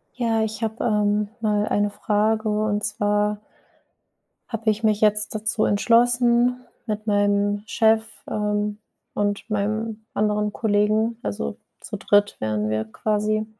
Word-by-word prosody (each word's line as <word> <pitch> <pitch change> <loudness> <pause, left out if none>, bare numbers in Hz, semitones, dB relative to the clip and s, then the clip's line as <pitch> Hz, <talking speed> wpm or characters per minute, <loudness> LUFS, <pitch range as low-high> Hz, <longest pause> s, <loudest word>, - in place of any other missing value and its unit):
Ja, 230 -3 0
ich 220 0 -4
habe, 220 +1 -2
ähm, 210 -2 +1
mal 210 -2 +1
eine 205 0 +1
Frage, 215 +1 0
und 210 0 0
zwar 210 0 0 1.1
habe 225 -2 0
ich 215 +2 -5
mich 215 -1 +2
jetzt 210 0 +4
dazu 215 0 0
entschlossen, 240 +3 +3 0.3
mit 215 0 -3
meinem 205 0 +1
Chef, 220 0 +3 0.3
ähm, 210 0 -1 0.3
und 205 0 -1
meinem 215 +1 -2
anderen 210 0 +1
Kollegen- 215 +1 +1
also 70 -9 -4 0.2
zu - - -6
dritt 205 0 +2
wären 105 0 -1
wir 110 0 -1
quasi- 215 - -1
210 Hz, 130 wpm, -23 LUFS, 205-220 Hz, 1.1 s, jetzt